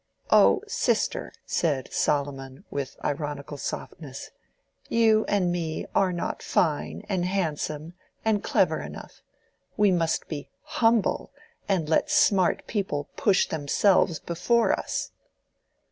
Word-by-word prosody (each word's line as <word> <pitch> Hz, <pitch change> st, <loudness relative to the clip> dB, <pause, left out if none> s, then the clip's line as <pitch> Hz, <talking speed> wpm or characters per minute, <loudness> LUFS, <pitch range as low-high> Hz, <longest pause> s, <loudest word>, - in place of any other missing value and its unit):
"Oh, -, -, +6 dB
sister," 470 Hz, +2 st, 0 dB
said 145 Hz, -6 st, -1 dB
Solomon, 135 Hz, -2 st, -1 dB
with 140 Hz, -2 st, -4 dB
ironical 145 Hz, -1 st, -3 dB
softness, 140 Hz, -2 st, -6 dB, 0.6 s
"you 220 Hz, -1 st, +4 dB
and 190 Hz, -4 st, +1 dB
me 165 Hz, -3 st, -3 dB
are 190 Hz, -2 st, +3 dB
not 175 Hz, -1 st, -3 dB
fine, 155 Hz, -4 st, 0 dB
and 190 Hz, -4 st, 0 dB
handsome, 160 Hz, -3 st, -2 dB, 0.3 s
and 215 Hz, -2 st, +2 dB
clever -, -, +2 dB
enough: -, -, -10 dB, 0.6 s
we 210 Hz, -2 st, +4 dB
must 165 Hz, -3 st, 0 dB
be 145 Hz, -3 st, -6 dB
humble 225 Hz, -2 st, +1 dB, 0.4 s
and 180 Hz, -6 st, +1 dB
let 165 Hz, -, +2 dB
smart 205 Hz, -12 st, +3 dB
people 195 Hz, -9 st, -2 dB
push 200 Hz, -3 st, +3 dB
themselves 160 Hz, +3 st, +2 dB
before 180 Hz, +10 st, +1 dB
us." -, -, -3 dB
175 Hz, 115 wpm, -26 LUFS, 150-205 Hz, 0.6 s, Oh